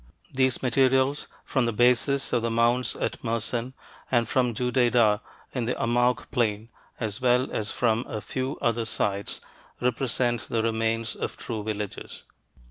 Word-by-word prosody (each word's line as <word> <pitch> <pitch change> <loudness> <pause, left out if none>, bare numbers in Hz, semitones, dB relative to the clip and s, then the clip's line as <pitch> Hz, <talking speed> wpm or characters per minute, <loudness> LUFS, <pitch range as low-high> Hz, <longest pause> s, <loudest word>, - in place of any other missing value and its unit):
These 130 -1 +1
materials 130 +2 +2 0.2
from 130 -3 +1
the 115 - +1
bases 125 +4 +2
of 120 - +3
the 115 - 0
mounds 120 +2 +2
at - - -3
Mersin, 115 +2 -2 0.4
and 120 -3 +2
from 125 -2 +1
Judaidah 120 -3 +3 0.3
in 125 -3 -1
the 125 - -1
Amouq 120 +1 +1
plain, 110 -2 0 0.3
as 110 0 -3
well 125 +1 +3
as 110 0 -2
from 115 0 0
a 110 - -4
few 130 +6 -3
other 115 0 +1
sites, 100 -2 -2 0.4
represent 120 -1 0
the 115 -1 0
remains 115 0 0
of - - -4
true 110 -2 -4
villages. 105 -2 -5
120 Hz, 145 wpm, -26 LUFS, 115-125 Hz, 0.4 s, of